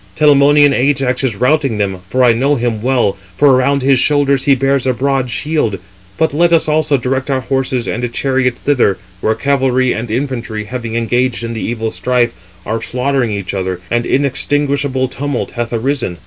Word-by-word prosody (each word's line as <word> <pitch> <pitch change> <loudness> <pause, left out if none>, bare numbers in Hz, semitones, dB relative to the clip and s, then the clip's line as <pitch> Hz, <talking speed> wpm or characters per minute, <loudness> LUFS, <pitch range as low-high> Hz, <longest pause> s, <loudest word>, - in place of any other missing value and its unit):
Telamonian 145 -1 +5
Ajax 135 -1 +1
is 125 -6 0
routing 130 0 +1
them, 95 -3 -2
for 130 +3 +1
I 120 -2 +5
know 135 +5 +1
him 120 -4 -2
well, 120 -6 +1 0.2
for 145 -2 +5
around 140 +1 +1
his 135 -1 +3
shoulders 140 -1 +2
he 140 - +5
bears 135 0 0
a 130 - +2
broad 135 0 0
shield. 120 -3 -1 0.4
But 160 -3 +1
let 170 +3 +2
us 165 -2 +3
also 150 -2 +2
direct 130 +2 -2
our 135 -1 0
horses 130 -2 -1
and 120 0 -3
chariot 130 -1 0
thither, 125 -10 +1 0.2
where 110 +3 0
cavalry 130 -1 +1
and 115 +1 -5
infantry, 120 -3 -3
having 115 0 -6
engaged 120 +1 0
in 115 0 -4
the 110 - -5
evil 115 -1 -3
strife, 125 -2 0 0.3
are 115 +1 -2
slaughtering 130 -1 -1
each 100 -3 -4
other, 95 -2 -3
and 120 0 0
inextinguishable 140 -1 +1
tumult 135 +1 -4
hath 120 -1 -4
arisen." 120 -5 -2
130 Hz, 175 wpm, -15 LUFS, 115-140 Hz, 0.4 s, Telamonian